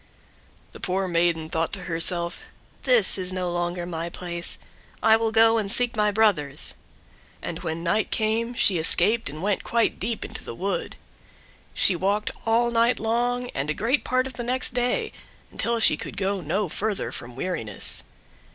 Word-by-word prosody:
The -, -, -12 dB
poor 190 Hz, +1 st, -1 dB
maiden 170 Hz, -2 st, +1 dB
thought 165 Hz, 0 st, -1 dB
to 190 Hz, -, -5 dB
herself: 170 Hz, +1 st, +1 dB, 0.4 s
"This 485 Hz, -, +4 dB
is 185 Hz, 0 st, -1 dB
no 180 Hz, -1 st, -2 dB
longer 175 Hz, 0 st, -2 dB
my 170 Hz, -1 st, -4 dB
place, 170 Hz, -1 st, -5 dB, 0.5 s
I 220 Hz, -, +6 dB
will 225 Hz, 0 st, 0 dB
go 225 Hz, 0 st, +5 dB
and 200 Hz, -2 st, -3 dB
seek 245 Hz, +1 st, +1 dB
my 210 Hz, -1 st, +2 dB
brothers;" 195 Hz, -10 st, +2 dB, 0.7 s
and -, -, -5 dB
when 160 Hz, +1 st, -4 dB
night 195 Hz, +5 st, +1 dB
came 230 Hz, +2 st, 0 dB
she 190 Hz, -6 st, +4 dB
escaped 215 Hz, +7 st, +3 dB
and 155 Hz, +4 st, -8 dB
went 205 Hz, -1 st, 0 dB
quite 230 Hz, -1 st, 0 dB
deep 230 Hz, -3 st, -3 dB
into -, -, -7 dB
the -, -, -7 dB
wood. 195 Hz, +9 st, -3 dB, 0.8 s
She 190 Hz, -, +5 dB
walked 200 Hz, +4 st, 0 dB, 0.2 s
all 235 Hz, +1 st, +3 dB
night 235 Hz, +1 st, +2 dB
long 245 Hz, +2 st, -1 dB
and 150 Hz, +3 st, -3 dB
great 245 Hz, +7 st, +1 dB
part 255 Hz, 0 st, +1 dB
of 265 Hz, -, -6 dB
the 240 Hz, -, -5 dB
next 255 Hz, +1 st, +1 dB
day, 245 Hz, 0 st, 0 dB, 0.4 s
until 235 Hz, 0 st, 0 dB
she -, -, +6 dB
could -, -, -7 dB
go 195 Hz, 0 st, -1 dB
no 185 Hz, +6 st, -1 dB
further 205 Hz, +5 st, -2 dB
from 120 Hz, 0 st, -8 dB
weariness. 125 Hz, -, -3 dB
200 Hz, 170 wpm, -25 LUFS, 170-230 Hz, 0.8 s, I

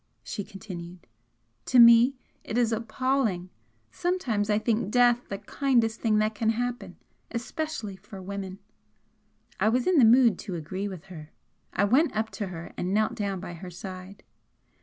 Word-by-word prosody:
she 205 Hz, -, -5 dB
continued. 180 Hz, -4 st, -9 dB, 0.6 s
"To 255 Hz, -, +2 dB
me 235 Hz, +2 st, +8 dB, 0.3 s
it 220 Hz, -, -4 dB
is 235 Hz, -2 st, +2 dB
appalling! 230 Hz, -5 st, -1 dB, 0.4 s
Sometimes 260 Hz, -, -1 dB
I 210 Hz, -, +3 dB
think 215 Hz, -2 st, 0 dB
death 245 Hz, +1 st, +3 dB
the 200 Hz, -, -3 dB
kindest 230 Hz, +1 st, 0 dB
thing 220 Hz, -2 st, +2 dB
that 215 Hz, +1 st, +1 dB
can 220 Hz, +1 st, 0 dB
happen 245 Hz, +2 st, -3 dB, 0.3 s
especially 240 Hz, -, -4 dB
for 195 Hz, 0 st, -11 dB
women." 190 Hz, 0 st, -6 dB, 1.0 s
I 215 Hz, -, +3 dB
was 245 Hz, +2 st, +1 dB
in 365 Hz, -4 st, +4 dB
the -, -, +7 dB
mood 230 Hz, -3 st, +6 dB
to 190 Hz, -4 st, -5 dB
agree 185 Hz, +5 st, -4 dB
with 185 Hz, -5 st, -8 dB
her. 155 Hz, -2 st, -10 dB, 0.4 s
I 200 Hz, -, +1 dB
went 260 Hz, +10 st, +3 dB
up 220 Hz, +1 st, -1 dB
to 205 Hz, -, -4 dB
her 170 Hz, -2 st, -8 dB
and 185 Hz, +3 st, -2 dB
knelt 215 Hz, 0 st, +2 dB
down 200 Hz, -3 st, -3 dB
by 175 Hz, -1 st, -7 dB
her 180 Hz, +2 st, -8 dB
side. 185 Hz, +2 st, -9 dB
215 Hz, 160 wpm, -27 LUFS, 190-240 Hz, 1.0 s, me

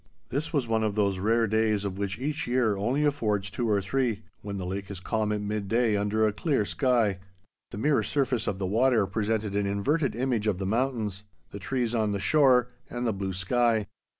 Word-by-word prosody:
This 145 Hz, +5 st, -2 dB
was 140 Hz, -6 st, 0 dB
one 110 Hz, -1 st, +1 dB
of 105 Hz, -2 st, 0 dB
those 100 Hz, -3 st, +1 dB
rare 115 Hz, +4 st, +2 dB
days 110 Hz, -1 st, +1 dB
of 95 Hz, 0 st, -4 dB
which 100 Hz, 0 st, -2 dB
each 150 Hz, +5 st, -2 dB
year 120 Hz, -4 st, +2 dB
only 125 Hz, +9 st, 0 dB
affords 105 Hz, -9 st, 0 dB
two 115 Hz, +2 st, -2 dB
or 100 Hz, -2 st, +2 dB
three, 115 Hz, -1 st, -1 dB, 0.2 s
when 100 Hz, -1 st, -5 dB
the 95 Hz, -, -4 dB
lake 95 Hz, +1 st, -4 dB
is 100 Hz, -3 st, -6 dB
calm 110 Hz, +2 st, -1 dB
at 105 Hz, -1 st, -1 dB
midday 105 Hz, +2 st, 0 dB
under 105 Hz, +2 st, +1 dB
a 105 Hz, -, +1 dB
clear 135 Hz, -4 st, 0 dB
sky. 105 Hz, +2 st, +1 dB, 0.5 s
The -, -, -8 dB
mirror 145 Hz, +6 st, +2 dB
surface 130 Hz, -5 st, 0 dB
of 100 Hz, -, -1 dB
the 95 Hz, -, -2 dB
water 115 Hz, +2 st, +3 dB
presented 105 Hz, +1 st, -1 dB
an 100 Hz, -1 st, +1 dB
inverted 135 Hz, +10 st, 0 dB
image 120 Hz, -3 st, 0 dB
of 100 Hz, -4 st, +1 dB
the 95 Hz, -, -3 dB
mountains, 110 Hz, -3 st, -1 dB, 0.3 s
the 100 Hz, -, -7 dB
trees 120 Hz, +2 st, -1 dB
on 110 Hz, -3 st, +1 dB
the 100 Hz, -, -2 dB
shore, 125 Hz, -1 st, +4 dB, 0.2 s
and 120 Hz, 0 st, -3 dB
the 115 Hz, -, +1 dB
blue 95 Hz, -1 st, -3 dB
sky. 110 Hz, +4 st, +1 dB
110 Hz, 205 wpm, -27 LUFS, 100-125 Hz, 0.5 s, shore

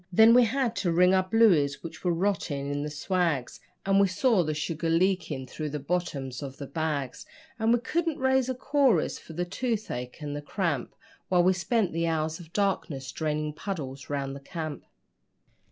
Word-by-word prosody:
Then 220 Hz, +5 st, +7 dB
we 245 Hz, 0 st, +7 dB
had 240 Hz, 0 st, 0 dB
to 175 Hz, -, +1 dB
wring 180 Hz, +2 st, +5 dB
our 190 Hz, -, +5 dB
blueys 175 Hz, -11 st, +4 dB
which 165 Hz, -, -8 dB
were 180 Hz, -, +2 dB
rotting 170 Hz, -6 st, -1 dB
in 145 Hz, 0 st, -2 dB
the 150 Hz, -, -3 dB
swags, 150 Hz, -3 st, -1 dB, 0.3 s
And 195 Hz, 0 st, +4 dB
we 200 Hz, -, +5 dB
saw 195 Hz, +1 st, +2 dB
the 155 Hz, -1 st, -2 dB
sugar 165 Hz, +2 st, -2 dB
leaking 175 Hz, -5 st, +1 dB
through 150 Hz, +4 st, -5 dB
the 150 Hz, -, -3 dB
bottoms 140 Hz, -5 st, -3 dB
of 135 Hz, -2 st, -7 dB
the 140 Hz, -, -6 dB
bags, 145 Hz, -4 st, -3 dB, 0.4 s
And 225 Hz, +1 st, +2 dB
we 240 Hz, -, +5 dB
couldn't 330 Hz, +3 st, -1 dB
raise 265 Hz, -1 st, +2 dB
a 260 Hz, -, -1 dB
chorus, 255 Hz, -, +2 dB
for 165 Hz, -, -12 dB
the 175 Hz, +2 st, -2 dB
toothache 200 Hz, -, -3 dB
and 145 Hz, -2 st, -5 dB
the 145 Hz, -, -4 dB
cramp, 150 Hz, -, -2 dB, 0.3 s
While 180 Hz, -1 st, +4 dB
we 185 Hz, +1 st, +5 dB
spent 190 Hz, +3 st, 0 dB
the 165 Hz, +1 st, 0 dB
hours 160 Hz, 0 st, -1 dB
of 165 Hz, -2 st, -12 dB
darkness 160 Hz, -, -1 dB
draining 150 Hz, +1 st, -2 dB
puddles 140 Hz, -7 st, -6 dB
round 140 Hz, -1 st, -2 dB
the -, -, -7 dB
camp. 155 Hz, 0 st, -6 dB
165 Hz, 185 wpm, -28 LUFS, 145-200 Hz, 0.4 s, Then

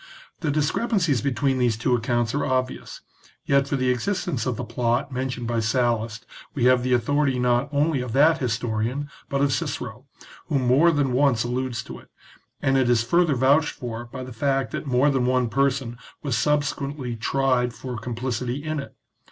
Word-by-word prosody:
The 160 Hz, -, -2 dB
discrepancies 155 Hz, -, +1 dB
between 135 Hz, 0 st, 0 dB
these 120 Hz, -3 st, +2 dB
two 120 Hz, +3 st, +1 dB
accounts 120 Hz, -1 st, 0 dB
are 145 Hz, -, 0 dB
obvious, 130 Hz, -1 st, -2 dB, 0.4 s
yet 140 Hz, 0 st, +3 dB
for 140 Hz, -, -1 dB
the 130 Hz, -1 st, +1 dB
existence 140 Hz, -, -2 dB
of 125 Hz, -, 0 dB
the -, -, -3 dB
plot 120 Hz, +4 st, -1 dB
mentioned 130 Hz, -1 st, -3 dB
by 115 Hz, 0 st, 0 dB
Sallust 115 Hz, -1 st, 0 dB, 0.3 s
we 130 Hz, -, -1 dB
have 130 Hz, 0 st, +5 dB
the 125 Hz, +1 st, 0 dB
authority 135 Hz, +3 st, +1 dB
not 125 Hz, +2 st, +1 dB
only 145 Hz, -1 st, +1 dB
of 125 Hz, -2 st, -5 dB
that 155 Hz, +5 st, +4 dB
historian, 120 Hz, +3 st, -2 dB, 0.2 s
but 140 Hz, 0 st, 0 dB
of 140 Hz, -1 st, +2 dB
Cicero, 130 Hz, -5 st, -4 dB, 0.4 s
who 150 Hz, -, +1 dB
more 130 Hz, +6 st, +4 dB
than 145 Hz, -5 st, +1 dB
once 125 Hz, -4 st, +3 dB
alludes 125 Hz, 0 st, -2 dB
to -, -, -9 dB
it, -, -, -19 dB, 0.5 s
and 135 Hz, 0 st, +3 dB
it 130 Hz, -2 st, +2 dB
is 120 Hz, -2 st, +3 dB
further 165 Hz, +3 st, +2 dB
vouched 140 Hz, +5 st, +3 dB
for 120 Hz, -2 st, -6 dB
by 130 Hz, +2 st, -8 dB
the 130 Hz, -1 st, -9 dB
fact 135 Hz, +2 st, 0 dB
that -, -, -5 dB
more 130 Hz, +3 st, +3 dB
than 130 Hz, -2 st, +1 dB
one 125 Hz, -2 st, +2 dB
person 130 Hz, -1 st, 0 dB, 0.2 s
was 140 Hz, -5 st, -1 dB
subsequently 140 Hz, -1 st, -1 dB
tried 125 Hz, +1 st, +1 dB
for 125 Hz, +1 st, -7 dB
complicity 120 Hz, +3 st, -3 dB
in 155 Hz, -1 st, -2 dB
it. 140 Hz, -, -8 dB
130 Hz, 180 wpm, -24 LUFS, 120-140 Hz, 0.5 s, have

